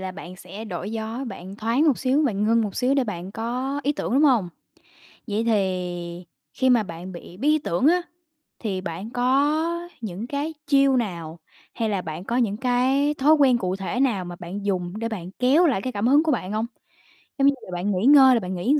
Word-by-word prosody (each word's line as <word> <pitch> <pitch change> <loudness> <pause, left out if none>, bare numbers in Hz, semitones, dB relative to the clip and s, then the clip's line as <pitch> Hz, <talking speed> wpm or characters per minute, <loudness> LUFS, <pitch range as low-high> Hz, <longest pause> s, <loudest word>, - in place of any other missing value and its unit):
là 190 -1 -5
bạn 185 -1 -10
sẽ 200 +4 -9
đổi 190 0 -5
gió, 225 +4 -4
bạn 195 -4 -8
thoáng 235 +9 +1
một 280 - +3
xíu, 270 +4 +2
bạn 210 -7 0
ngưng 230 +1 +3
một 205 -3 -4
xíu 260 +2 +2
để 270 - +2
bạn 190 -3 -6
có 250 +6 -3
ý 290 - +1
tưởng, 295 - -4
đúng 285 - +4
hông? 240 -11 +4 0.8
Vậy 210 +2 -1
thì 180 -5 -2 0.3
khi 260 -1 +1
mà 235 -3 +4
bạn 175 +1 -8
bị 175 0 -11
bí 275 +8 -1
ý 310 - +4
tưởng 255 - 0
á, 355 +3 +4 0.6
thì 195 -5 -3
bạn 185 +4 -6
có 300 +8 +1
những 215 +1 -5
cái 290 +3 -3
chiêu 275 -2 +4
nào 170 -7 -4 0.3
hay 225 -2 -1
là 195 -3 -1
bạn 160 +1 -6
có 235 +5 -2
những 215 -5 +1
cái 265 +4 +2
thói 295 +2 +4
quen 275 -5 +4
cụ 185 -4 -2
thể 195 +6 -3
nào 220 -9 +1
mà 175 0 -7
bạn 190 +4 -6
dùng 180 -3 -1
để 230 - -2
bạn 185 -5 -6
kéo 275 +8 +4
lại 265 - +2
cái 255 +4 -4
cảm 205 +3 0
hứng 285 +4 +5
của 320 - +1
bạn 205 -7 -2
hông? 215 +2 -1 0.7
Giống 275 0 +4
như 280 - +5
giờ - - -11
bạn 180 +4 -1
nghỉ 190 +4 0
ngơi 270 -2 +8
là 235 - +2
bạn 185 -1 -5
nghỉ 190 +11 +1
làm 300 - +3
225 Hz, 225 wpm, -24 LUFS, 185-270 Hz, 0.8 s, ngơi